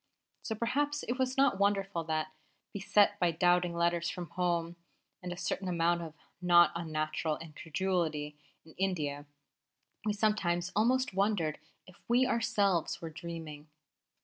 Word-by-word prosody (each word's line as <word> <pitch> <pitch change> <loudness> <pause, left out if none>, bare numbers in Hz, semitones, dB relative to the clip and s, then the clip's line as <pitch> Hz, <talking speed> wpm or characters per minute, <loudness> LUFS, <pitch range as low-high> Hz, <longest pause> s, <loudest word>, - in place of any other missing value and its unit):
So 220 - -3
perhaps 285 +6 -1
it 245 +2 -3
was 260 0 0
not 270 -7 +3
wonderful 195 -3 +1
that, 155 -1 -2 0.4
beset 200 +1 +3
by 175 - +3
doubting 175 +1 +2
letters 170 0 +1
from 175 -3 -6
home 175 -1 -1 0.5
and 180 -1 -5
a 175 - -5
certain 190 +1 -2
amount 170 -1 +1
of 160 -2 -8 0.3
not 175 -1 +6
unnatural 155 -1 -2
incredulity 160 -1 -2 0.3
in 160 - -15
India, 150 -7 -1 0.8
we 210 -1 0
sometimes 185 -5 0
almost 250 +3 +2
wondered 195 -6 0 0.3
if 185 - -18
we 245 +2 +4
ourselves 210 -8 +1
were 165 -1 -6
dreaming. 160 -2 -8
175 Hz, 135 wpm, -31 LUFS, 165-205 Hz, 0.8 s, not